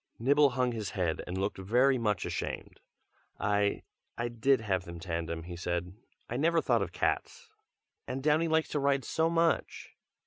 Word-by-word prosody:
Nibble 140 +4 +4
hung 125 -1 +2
his 110 -4 -4
head 85 -4 0
and 90 - -4
looked 95 +1 -2
very 125 +7 +3
much 105 -3 0
ashamed. - - -4 0.6
"I 100 0 +1 0.3
I 120 0 -1
did 120 +2 +2
have 95 -4 0
them 85 -1 -8
tandem," 85 -1 -3
he 85 +1 -7
said. 85 +1 -3 0.3
"I 120 - -3
never 165 +4 +3
thought - - +2
of - - -2
cats, 465 -2 -2 0.6
and 130 +1 -4
Downy 155 +2 +3
likes 160 0 +1
to 150 - -1
ride 140 -1 +1
so 160 0 +1
much!" 165 0 0
120 Hz, 170 wpm, -30 LUFS, 95-145 Hz, 0.6 s, Nibble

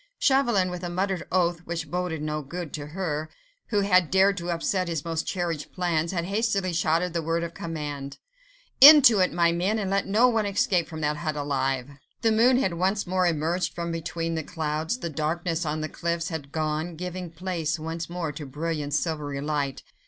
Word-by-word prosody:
Chauvelin, 240 -10 +3
with 180 0 -6
a 175 - -3
muttered 185 0 -2
oath, 175 -2 +2
which 170 0 -5
boded 175 -3 -2
no 155 0 -2
good 165 +2 -7
to 145 -1 -5
her, 155 -2 -3 0.4
who 205 -3 +1
had 185 -4 +3
dared 190 +2 +4
to 175 0 -4
upset 180 +2 0
his 165 -3 -3
most 165 -1 -2
cherished 170 -5 -3
plans, 170 -3 0
had 170 -3 -2
hastily 200 -2 0
shouted 165 +2 +1
the 170 - 0
word 165 +1 -1
of 170 0 -5
command,— 145 -4 -5 0.6
"Into 275 -7 +10
it, 185 - +3
my 170 -1 +3
men, 185 +6 0
and 195 -3 -2
let 195 0 +1
no 220 +5 +4
one 225 -4 +1
escape 195 -3 +1
from 160 -1 -7
that 150 0 0
hut 155 -1 -3
alive!" 135 -2 -1 0.3
The 225 - +4
moon 240 +4 +5
had 190 -9 +1
once 190 +4 0
more 185 0 +1
emerged 170 +2 -1
from 170 -1 -3
between 165 0 -3
the 160 - -1
clouds: 160 +5 -2
the 170 - -4
darkness 165 +2 -2
on 155 +1 -2
the 155 - -2
cliffs 170 +1 -2
had 150 -5 -6
gone, 155 +2 -2
giving 180 +1 -5
place 165 -1 -2
once 165 +1 -5
more 170 -3 -3
to 150 0 -8
brilliant, 150 0 -3
silvery 150 -4 -2
light. 145 -2 -2
170 Hz, 195 wpm, -26 LUFS, 155-185 Hz, 0.6 s, Into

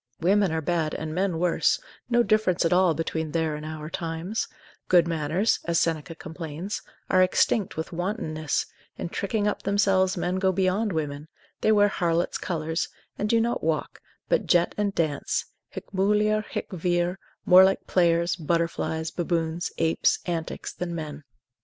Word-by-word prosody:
Women 195 +2 +3
are 160 0 -1
bad 160 -1 -1
and 155 0 -4
men 185 -1 0
worse, 175 0 +2 0.3
no 240 -1 +4
difference 215 -6 +2
at 165 - +3
all 180 -3 +4
between 160 0 -2
their 160 -2 0
and 150 - -7
our 155 -1 -6
times; 165 +5 -3 0.4
good 175 -2 +5
manners 165 +6 +1
(as 170 -1 +2
Seneca 165 -1 -1
complains) 165 +4 -6 0.3
are 185 - +5
extinct 190 +2 +2
with 160 +3 -4
wantonness, 165 -5 -2 0.3
in - - -4
tricking 205 +3 -1
up 210 - -1
themselves 195 -2 +2
men 180 +1 -1
go 190 0 +2
beyond 190 +3 +1
women, 150 -2 -3 0.3
they 220 - +3
wear 205 -1 +5
harlots' 170 -3 0
colours, 160 -1 -2 0.3
and 210 - -1
do 230 - +4
not 235 +1 0
walk, 160 -1 -2 0.3
but - - +1
jet 175 0 +3
and 205 -1 -1
dance, 155 -4 0 0.2
hic - - -9
mulier, 210 +2 +2
haec - - -4
vir, 175 +1 0 0.3
more 185 +1 +9
like 190 0 +2
players, 170 -1 +2
butterflies, 160 -1 -1
baboons, 170 -1 -1
apes, 165 0 +2
antics, 170 -2 -4
than 175 -1 -4
men. 150 -2 -6
175 Hz, 160 wpm, -26 LUFS, 160-190 Hz, 0.4 s, more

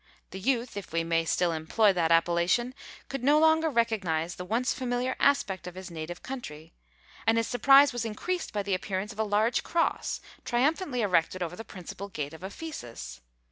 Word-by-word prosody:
The 190 - -6
youth, 240 +1 0
if 200 - -7
we 165 0 0
may 165 0 +1
still 175 +1 +1
employ 180 +6 +2
that 170 -2 +1
appellation, 170 +9 +2 0.3
could 275 -2 -5
no 290 +3 +5
longer 320 +1 +4
recognise 195 - 0
the 180 - -7
once 230 +7 0
familiar 250 0 -1
aspect 195 -11 +2
of 180 - -8
his 185 -1 -8
native 165 +1 -6
country; 165 - -7 0.5
and 225 0 +4
his 230 - +2
surprise 275 +3 +6
was 240 -1 -2
increased 330 - -3
by 205 -1 -2
the 200 -1 -1
appearance 195 +2 -2
of 210 - -15
a - - +3
large 215 +3 +2
cross, 335 -1 0 0.2
triumphantly 265 +2 +1
erected 180 -1 +1
over 175 0 -5
the 225 - -7
principal 195 -1 -8
gate 150 -5 -5
of 160 - -11
Ephesus. 120 - -7
205 Hz, 180 wpm, -28 LUFS, 170-250 Hz, 0.5 s, surprise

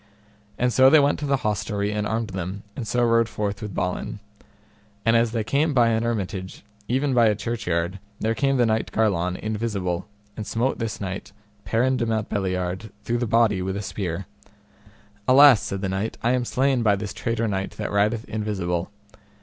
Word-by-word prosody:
And 125 0 +1
so 130 0 +7
they 155 +2 +7
went 145 0 +2
to 145 - -3
the 140 -1 0
hostelry 105 0 -1
and 105 0 -1
armed 110 -1 -2
them, 95 +2 -5
and 115 - -5
so 120 +2 +1
rode 115 -1 +3
forth 100 -2 -3
with 105 -4 -6
Balin. 90 +3 -2 0.9
And 115 0 +4
as 115 -1 +3
they 115 -2 -1
came 140 +6 +1
by 120 -2 +5
an 110 -1 +1
hermitage 100 -6 -3 0.2
even 135 +2 +1
by 120 -2 +5
a 105 - +3
churchyard, 95 -5 -2 0.2
there 110 +1 +1
came 135 +3 +1
the 120 - +4
knight 110 0 0
Garlon 90 -5 +1
invisible, 105 -5 -2 0.3
and 110 - -6
smote 120 +4 0
this 115 -2 -3
knight, 95 0 -5 0.3
Perin 130 +3 +2
de 120 -1 -1
Mountbeliard, 95 -3 -2
through 120 +2 -1
the 120 - -1
body 110 -3 +3
with 95 +1 -2
a 100 - -4
spear. 95 -2 -4 1.0
Alas, 130 -3 +8
said 95 0 -4
the 95 - -1
knight, 95 +4 -2
I 120 - +3
am 125 -1 +1
slain 130 0 +1
by 105 -3 +4
this 105 +1 -5
traitor 115 -1 -1
knight 95 -2 -3
that 105 - -3
rideth 105 +3 +1
invisible. 95 -5 -2
110 Hz, 185 wpm, -24 LUFS, 100-120 Hz, 1.0 s, Alas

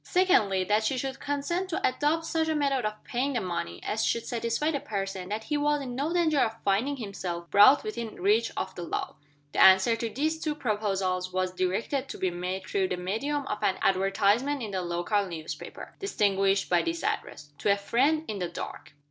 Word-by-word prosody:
Secondly, 215 - +3
that 210 +4 +2
she 255 +4 0
should 265 +1 -3
consent 315 +6 -2
to 330 - +1
adopt 300 +5 0
such 320 0 0
a 315 - 0
method 275 -5 +1
of 215 0 -4
paying 265 +3 -1
the 245 - +1
money 170 - -4
as 220 +1 -1
should 235 - 0
satisfy 235 +6 -1
the 285 - -1
person 195 -5 -4
that 215 +2 -3
he 295 +5 -1
was 295 0 +2
in 260 -3 -5
no 280 +6 -1
danger 330 -4 +2
of 225 -3 0
finding 225 +9 +1
himself 185 -6 -5
brought 205 +8 +7
within 235 - -5
reach 210 +5 +3
of - - -3
the - - -7
law. 170 - -3 0.4
The - - +1
answer 190 +5 +7
to 230 0 -3
these 310 +7 -1
two 305 -2 -1
proposals 195 -7 -1
was 185 0 0
directed 205 +10 -1
to - - -6
be 185 - 0
made 180 +2 -4
through 190 -1 0
the 180 - -3
medium 270 +11 -2
of 210 - -4
an 190 - +1
advertisement 200 +8 +2
in 215 - -5
the 190 -1 -1
local 175 +4 0
newspaper 160 -3 -7
distinguished 195 - +1
by 175 -1 +3
this 335 0 -3
address, 275 - -3
"To 205 - +2
a 200 - +3
Friend 275 +10 +1
in 210 -2 -4
the 175 -2 -2
Dark." 170 - -7
220 Hz, 205 wpm, -28 LUFS, 190-285 Hz, 0.4 s, brought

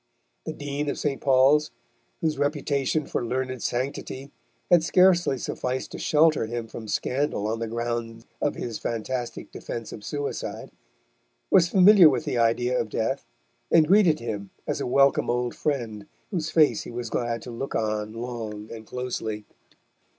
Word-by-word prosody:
The - - -2
Dean 145 +1 -3
of - - -3
St. 140 -2 -2
Paul's, 140 +3 +4 0.5
whose 155 -4 0
reputation 145 0 0
for - - -2
learned 130 +1 -2
sanctity 135 +2 -3 0.4
had 175 -2 +6
scarcely 175 -5 +4
sufficed 130 +1 -3
to - - -7
shelter 155 -6 +3
him 120 0 -4
from 110 0 -8
scandal 130 -1 -1
on 110 +1 -1
the 115 - -2
ground 115 0 -4 0.2
of 145 - 0
his 115 -3 -5
fantastic 120 +2 -4
defence 115 -2 -6
of 105 - -9
suicide, 145 +3 -4 0.8
was 175 -1 +5
familiar 190 -2 +8
with 155 - -1
the 125 -5 -1
idea 120 +2 +2
of 110 - -2
Death, 125 +6 -2 0.4
and 160 -2 +5
greeted 185 -4 +5
him 105 -4 -5 0.2
as - - -2
a - - -2
welcome 135 +2 +3
old 120 0 0
friend 115 -8 -3 0.2
whose 160 -5 -2
face 150 -9 +4
he - - -8
was 120 -1 -5
glad 120 -2 -2
to 125 - -8
look 135 +4 -5
on 110 -1 -1
long 115 -3 -6
and 110 -1 -9
closely. 115 -4 -4
125 Hz, 160 wpm, -26 LUFS, 115-145 Hz, 0.8 s, familiar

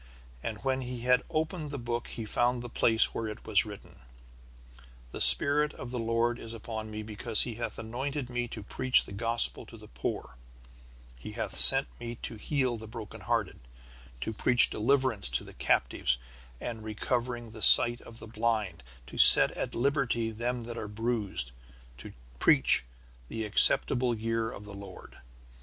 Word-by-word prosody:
And 110 -2 -5
when 135 -1 -1
he 125 -1 -7
had 125 +1 +2
opened 155 0 -3
the 140 - -6
book 120 -1 -5
he 115 - -7
found 120 +2 -1
the 120 - -8
place 115 -1 +2
where 115 - -4
it 105 +1 -9
was 120 - +1
written: 105 -1 -13 1.1
"The - - -6
Spirit 150 +1 +6
of 120 - -9
the 125 - -4
Lord 115 +1 -1
is 115 0 -9
upon 110 0 -7
me 110 0 -7
because 110 +1 +4
he 120 - -5
hath 115 0 -6
anointed 130 +4 -5
me 120 -1 -4
to 110 -3 -9
preach 130 +5 +1
the - - -13
Gospel 115 +3 +4
to - - -13
the - - -15
poor; 65 0 -6 0.8
he - - -10
hath - - -5
sent - - +6
me 120 0 -7
to - - -6
heal 130 0 -2
the 110 0 -10
broken 110 -1 -10
hearted, - - -3 0.6
to 110 - -4
preach 125 +3 +4
deliverance 120 - 0
to 65 - -1
the - - -14
captives, 60 - -1 0.4
and 115 -2 -7
recovering 120 +1 -4
of 110 - -5
sight 120 0 +7
to - - -15
the 115 0 -10
blind, 110 -3 -3 0.2
to 65 - -10
set - - +7
at - - -6
liberty 120 -3 -1
them 120 +2 -4
that 120 0 -7
are 105 - -6
bruised, 105 - -3 0.5
to - - -10 0.3
preach - - +3 0.4
the 110 - -5
acceptable 120 +3 +4
year 115 0 -3
of 100 - -11
the 105 0 -11
Lord. 100 -8 -12
115 Hz, 170 wpm, -28 LUFS, 110-125 Hz, 1.1 s, sight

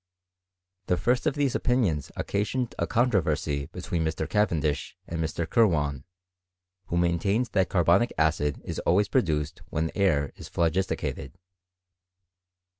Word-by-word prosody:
The 90 - +2
first 125 - +1
of 145 - +1
these 140 -3 +1
opinions 105 - 0
occasioned 115 +5 -2
a - - 0
controversy, 80 - +1
between 85 -2 -3
Mr. 80 0 -2
Cavendish, 80 -9 0
and 85 -1 -3
Mr. 80 +1 -2
Kirwan, 75 - +2 0.8
who 85 - -1
main 85 -1 +2
tained 105 +8 0
that 95 -2 +2
carbonic 100 +6 +3
acid 75 -2 +1
is - - -4
always 100 +4 +2
produced 75 - 0
when 80 +1 -1
air 75 -9 +1
is - - -10
phlogisticated. 85 0 -1
85 Hz, 125 wpm, -27 LUFS, 80-105 Hz, 0.8 s, carbonic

